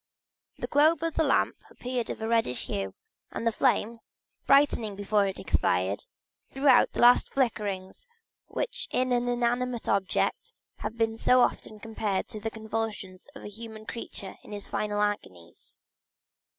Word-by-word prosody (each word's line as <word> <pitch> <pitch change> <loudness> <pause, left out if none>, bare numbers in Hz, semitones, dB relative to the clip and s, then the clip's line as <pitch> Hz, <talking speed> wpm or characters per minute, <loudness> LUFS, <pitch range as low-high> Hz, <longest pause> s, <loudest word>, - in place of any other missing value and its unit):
The - - -3
globe 310 +2 +3
of 330 -1 -1
the 320 - +2
lamp 280 - +2
appeared 250 -1 -4
of - - -5
a - - -1
reddish 225 - +1
hue, 95 -1 -3 0.3
and - - -5
the 230 - +3
flame, 230 +1 +1 0.5
brightening 275 -7 +4
before 205 0 +1
it 195 - -4
expired, 95 - 0 0.4
threw 270 +2 -2
out 255 -2 +6
the - - -2
last 245 +1 +6
flickerings 210 - -2 0.4
which - - -3
in 255 0 0
an 245 0 +1
inanimate 245 0 0
object 195 -2 0 0.2
have 215 +2 -5
been 225 -1 0
so 250 +2 +4
often 215 -3 -1
compared 210 -2 -2
with 215 - -6
the 225 - -2
convulsions 220 -4 -5
of 275 - -10
a - - -6
human 220 +1 -9
creature 200 -4 -7
in - - -11
its 205 -1 -7
final 210 -1 -2
agonies. 90 - -5
225 Hz, 155 wpm, -28 LUFS, 205-245 Hz, 0.5 s, out